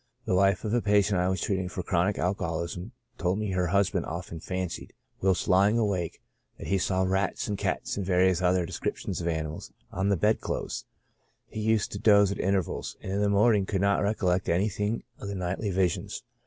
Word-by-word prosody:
The - - 0
wife 95 0 +3
of 110 - -1
a 120 - +3
patient 100 -2 +3
I 90 +1 +2
was 95 - -1
treating 95 -2 -1
for 90 0 -5
chronic 90 +3 +1
alcoholism 90 -1 -2 0.3
told 90 +2 +1
me 105 -2 -2
her 90 -1 +1
husband 100 +2 +1
often 85 0 -6
fancied, 90 0 -4 0.3
whilst 95 -2 +1
lying 100 +4 +4
awake, 100 -7 -1 0.3
that - - -8
he 95 - +1
saw 95 +1 +1
rats 95 +1 0
and 105 - -1
cats - - -2
and 100 - -1
various 90 -1 +3
other 90 -1 +2
descrip - - -3
tions - - -4
of 85 - -3
animals, 80 -2 -3 0.2
on 95 +2 0
the 100 - +2
bed 105 +6 +2
clothes; - - -4 0.6
he - - -7
used 110 -1 +1
to 100 - -5
doze 100 -2 +5
at - - -4
intervals, 95 -3 -1
and 95 - -5
in 100 +1 0
the 105 - +2
morning 100 -1 +3
could 95 -2 -1
not 100 0 +3
recollect 95 -3 +1
anything 105 +5 0 0.2
of 100 - -6
the 100 - -4
nightly 95 +3 -2
visions. 95 -2 -1
95 Hz, 200 wpm, -28 LUFS, 90-100 Hz, 0.6 s, doze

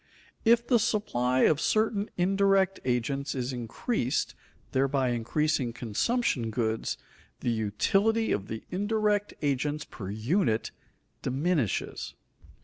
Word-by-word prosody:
If 235 +1 +5
the 240 -1 +4
supply 130 - +1
of 155 -1 +4
certain 215 -1 +1
indirect 195 +1 +3
agents 135 +3 -1
is 130 0 -2
increased, 125 - -1 0.4
thereby 135 -1 +2
increasing 120 +2 0
consumption 120 - 0
goods, 110 0 -1 0.4
the 120 - 0
utility 195 - +1
of 100 -1 -1
the 110 - -5
indirect 205 +1 0
agents 145 +2 0
per 95 -4 -8
unit 115 - 0 0.5
diminishes. 140 - -1
140 Hz, 105 wpm, -28 LUFS, 120-200 Hz, 0.5 s, If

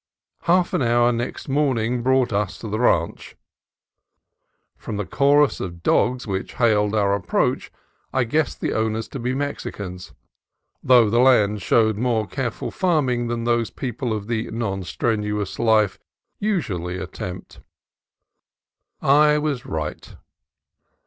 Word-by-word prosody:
Half 175 +1 +3
an - - +1
hour 120 0 +3
next 120 +1 -4
morning 125 -4 0
brought 130 -2 +2
us 100 -1 -1
to 115 - -8
the 110 +1 -3
ranch. 85 -9 0 1.4
From 110 - -6
the 105 - -2
chorus 140 +3 +3
of 85 -2 -6
dogs 125 +1 +2
which 95 -3 -4
hailed 105 -3 +2
our 100 -2 +2
approach 95 -4 -1 0.4
I 130 - +1
guessed 150 +6 -1
the - - -1
owners 110 0 -1
to 135 - -6
be 125 +2 -2
Mexicans, 100 -10 -5 0.7
though 125 -3 +5
the 120 - +3
land 105 -5 +4
showed 110 0 +2
more 115 -2 0
careful 125 0 -4
farming 135 -10 +1
than 120 0 -2
those 120 -1 +1
people 125 -1 -4
of 105 -2 -3
the 115 0 -2
non 100 -4 -3
strenuous 105 +2 -2
life 110 -3 +2 0.4
usually 95 - -2
at 90 - -7
tempt. 90 0 -7 1.4
I 150 +2 +5
was 150 -5 -2
right. 75 -1 -5
115 Hz, 135 wpm, -22 LUFS, 105-130 Hz, 1.4 s, though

